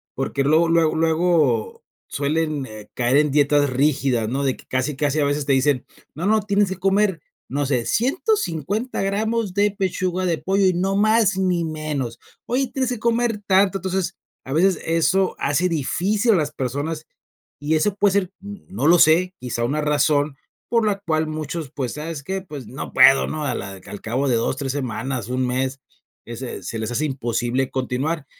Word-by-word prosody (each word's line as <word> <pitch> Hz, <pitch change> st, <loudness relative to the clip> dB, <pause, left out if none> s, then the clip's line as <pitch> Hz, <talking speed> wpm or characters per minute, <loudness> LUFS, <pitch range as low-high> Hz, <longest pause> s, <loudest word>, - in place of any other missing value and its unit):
Porque 135 Hz, +1 st, -1 dB
luego 160 Hz, +4 st, +3 dB
luego 165 Hz, -2 st, +3 dB
luego 160 Hz, -7 st, +1 dB, 0.2 s
suelen, 150 Hz, 0 st, -1 dB
eh, 110 Hz, -3 st, -11 dB
caer 125 Hz, +2 st, +2 dB
en 150 Hz, -1 st, +3 dB
dietas 145 Hz, 0 st, +3 dB
rígidas, 135 Hz, -3 st, +1 dB
¿no? 135 Hz, +5 st, -1 dB
De 135 Hz, -2 st, 0 dB
que -, -, -17 dB
casi, 130 Hz, +2 st, -1 dB
casi, 145 Hz, 0 st, 0 dB
a -, -, +3 dB
veces, 145 Hz, 0 st, -1 dB
te 140 Hz, -, +2 dB
dicen: 135 Hz, -1 st, +2 dB, 0.3 s
"No, 165 Hz, +5 st, -4 dB
no, 215 Hz, +1 st, +3 dB
tienes 205 Hz, 0 st, +2 dB
que 190 Hz, -, -3 dB
comer, 195 Hz, -2 st, +1 dB, 0.3 s
no 145 Hz, +2 st, -1 dB
sé, 125 Hz, -4 st, 0 dB
150 240 Hz, -, 0 dB
gramos 210 Hz, +1 st, -1 dB
de 205 Hz, +1 st, +2 dB
pechuga 185 Hz, -2 st, -1 dB
de 170 Hz, -3 st, +1 dB
pollo 195 Hz, +1 st, +1 dB
y 185 Hz, -, +4 dB
no 190 Hz, +3 st, 0 dB
más, 215 Hz, -2 st, +3 dB
ni 180 Hz, -3 st, +1 dB
menos. 155 Hz, -7 st, -4 dB, 0.3 s
Oye, 260 Hz, +3 st, 0 dB
tienes 260 Hz, -1 st, 0 dB
que 245 Hz, -, -3 dB
comer 235 Hz, -1 st, +1 dB
tanto". 195 Hz, 0 st, +4 dB
Entonces, 190 Hz, -1 st, -2 dB, 0.3 s
a 130 Hz, -, -9 dB
veces, 180 Hz, +3 st, +3 dB
eso 175 Hz, +4 st, +2 dB
hace 150 Hz, +6 st, +1 dB
difícil 195 Hz, -, +1 dB
a -, -, +4 dB
las 150 Hz, -4 st, 0 dB
personas, 150 Hz, +4 st, -3 dB, 0.5 s
y 150 Hz, +2 st, 0 dB
eso 185 Hz, +6 st, +1 dB
puede 205 Hz, -1 st, +3 dB
ser, 195 Hz, -2 st, +1 dB
n 205 Hz, 0 st, -9 dB
no 120 Hz, +8 st, -2 dB
lo 175 Hz, +2 st, +6 dB
sé, 180 Hz, +4 st, +4 dB
quizá 120 Hz, -2 st, -3 dB
una 145 Hz, +5 st, 0 dB
razón 150 Hz, -1 st, +1 dB, 0.3 s
por 230 Hz, -2 st, +2 dB
la 200 Hz, -2 st, 0 dB
cual 160 Hz, -2 st, 0 dB
muchos, 155 Hz, -1 st, -5 dB
pues: 130 Hz, -5 st, -3 dB
"¿Sabes 150 Hz, -1 st, -5 dB
qué?, 190 Hz, +6 st, -3 dB
pues, 145 Hz, -, -9 dB
no 135 Hz, -, -7 dB
puedo", 135 Hz, -, +6 dB
¿no? 155 Hz, -1 st, -4 dB
A 125 Hz, -, -1 dB
la 95 Hz, -1 st, -7 dB
al 105 Hz, -, -8 dB
cabo 130 Hz, +5 st, -1 dB
de 125 Hz, -, +2 dB
2, 115 Hz, +3 st, 0 dB
3 135 Hz, -1 st, -3 dB
semanas, 130 Hz, -3 st, -3 dB
un 130 Hz, +1 st, -1 dB
mes, 130 Hz, +2 st, -2 dB, 0.4 s
ese 120 Hz, -3 st, -7 dB
se 115 Hz, +5 st, -5 dB
les 110 Hz, +1 st, -3 dB
hace 140 Hz, +6 st, 0 dB
imposible 125 Hz, -1 st, -1 dB
continuar. 135 Hz, +4 st, -2 dB
155 Hz, 190 wpm, -22 LUFS, 135-190 Hz, 0.5 s, lo